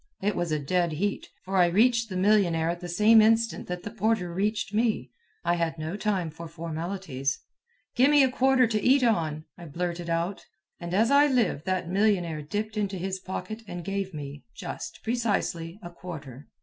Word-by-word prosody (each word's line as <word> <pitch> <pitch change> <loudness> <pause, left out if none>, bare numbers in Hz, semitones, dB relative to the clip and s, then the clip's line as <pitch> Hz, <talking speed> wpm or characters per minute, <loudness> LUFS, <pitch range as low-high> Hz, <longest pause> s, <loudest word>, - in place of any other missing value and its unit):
It 205 +1 0
was 175 -2 -1
a 155 - +2
dead 170 +3 0
heat, 200 +6 -2 0.2
for 190 +1 -1
I 180 -1 +6
reached 230 +5 +3
the 185 - -3
millionnaire 185 -5 +3
at 175 - -5
the 175 0 -7
same 215 +5 +6
instant 225 +1 +2
that 180 0 -5
the 210 - -6
porter 210 -5 0
reached 205 +2 -1
me. 215 - 0 0.3
I 170 - +3
had 165 -1 -1
no 160 +4 -4
time 200 -6 -1
for 165 +2 -9
formalities. 165 -4 -3 0.6
"Gimme 285 +3 +6
a 260 - +2
quarter 265 0 +4
to 215 -2 0
eat 260 +4 +4
on," 160 -9 +1
I 170 - -9
blurted 170 +2 -4
out. 170 +4 -1 0.4
And 175 +1 -4
as 225 +5 +3
I 285 +1 +6
live, 235 - +1
that 185 -2 -1
millionnaire 180 -5 +1
dipped 210 +8 -4
into 200 -2 -1
his 190 +1 -3
pocket 215 +4 -6
and 175 -2 -6
gave 195 0 -2
me... 145 -2 -7
just... - - -7
precisely... 205 -7 -1
a 175 - -7
quarter. 150 -7 -9
185 Hz, 185 wpm, -27 LUFS, 170-215 Hz, 0.6 s, I